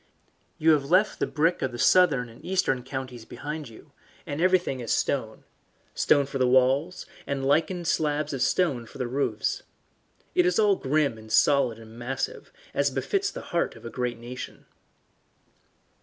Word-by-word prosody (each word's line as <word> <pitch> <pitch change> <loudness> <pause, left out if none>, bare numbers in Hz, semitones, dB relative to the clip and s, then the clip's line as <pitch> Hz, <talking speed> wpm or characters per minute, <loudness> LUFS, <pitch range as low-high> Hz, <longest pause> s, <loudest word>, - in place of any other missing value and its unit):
You 160 +1 +4
have 145 -3 +2
left 185 +5 +3
the - - 0
brick 165 +3 +1
of 130 - -1
the 120 - -7
southern 140 -2 +4
and 115 0 -16
eastern 180 -9 0
counties 130 -2 -6
behind 150 +3 -6
you, 110 - -16 0.3
and 145 +3 -4
everything 180 -7 +2
is 120 -2 -4
stone - - -1 0.5
stone 140 -1 +3
for 135 0 -5
the 130 - +3
walls, 130 +7 +2 0.2
and 135 -1 -2
lichened 160 +5 +1
slabs 150 -2 0
of 135 - -3
stone 135 -3 +1
for - - -13
the 125 - -2
roofs. 135 +4 -1 0.7
It 360 0 +4
is - - +1
all 210 -2 +4
grim 140 -6 0
and 110 0 -13
solid 135 -6 +3
and 115 +1 -13
massive, 135 - -4 0.2
as - - +2
befits 405 -1 -1
the - - -7
heart 170 - 0
of 115 - -14
a 115 - -6
great 125 -2 -2
nation. 120 +2 -8
140 Hz, 170 wpm, -26 LUFS, 125-165 Hz, 0.7 s, You